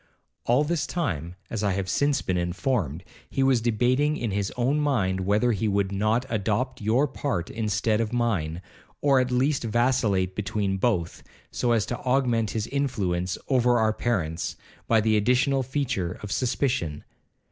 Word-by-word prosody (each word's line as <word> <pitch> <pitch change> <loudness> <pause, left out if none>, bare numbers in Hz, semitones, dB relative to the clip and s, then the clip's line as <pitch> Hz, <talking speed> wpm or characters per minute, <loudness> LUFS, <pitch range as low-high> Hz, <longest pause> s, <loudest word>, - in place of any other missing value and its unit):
'All 125 +5 +3
this 165 +1 -1
time, 90 - -3 0.2
as 110 -2 -2
I 100 -2 +2
have 95 0 -2
since 140 +5 +1
been 95 - -1
informed, 90 - -1 0.3
he 135 - 0
was 130 -3 +3
debating 125 +6 +2
in 115 -4 -2
his 100 0 -1
own 130 +5 +1
mind 110 -11 +1
whether 110 +4 +3
he 110 0 0
would 100 -1 +1
not 110 +5 +1
adopt 115 +4 -1
your 115 +8 +2
part 130 -10 -3
instead 110 0 0
of 110 - -2
mine, 95 -9 -1 0.4
or 140 -2 +4
at 125 0 +1
least 130 +3 +1
vacillate 115 -5 +1
between 100 -1 -1
both, 95 -6 -1 0.3
so 120 - 0
as 115 -3 +2
to 120 - -4
augment 125 -4 +1
his 110 -2 -2
influence 100 -11 -1
over 125 -2 +3
our 110 -1 +2
parents, 90 -9 -2 0.3
by 115 -1 +4
the 110 0 +2
additional 125 +5 +2
feature 125 -9 -2
of 105 - -6
suspicion. 120 - -1
115 Hz, 160 wpm, -26 LUFS, 100-130 Hz, 0.4 s, or